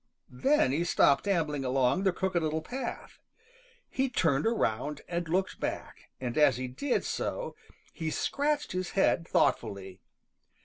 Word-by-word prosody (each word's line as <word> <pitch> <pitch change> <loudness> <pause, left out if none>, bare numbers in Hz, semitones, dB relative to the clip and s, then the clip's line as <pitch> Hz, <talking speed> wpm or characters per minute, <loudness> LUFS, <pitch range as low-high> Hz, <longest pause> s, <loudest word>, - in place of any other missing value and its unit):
Then 200 - +3
he 155 +5 +1
stopped 175 -1 +3
ambling 155 -7 0
along 130 +8 +1
the 190 - +4
Crooked 185 -1 -1
Little 155 0 -1
Path. 260 +9 -6 0.7
He 265 0 -1
turned 160 - +2
around 145 - -1
and 170 -1 -3
looked 185 +3 0
back, - - -5
and 125 +1 -2
as 140 -5 +5
he 130 0 -3
did 245 - -1
so - - -3 0.4
he 160 -2 -3
scratched 295 - -1
his 185 0 -3
head 170 -3 +3
thoughtfully. 95 -2 0
165 Hz, 140 wpm, -30 LUFS, 135-195 Hz, 0.7 s, as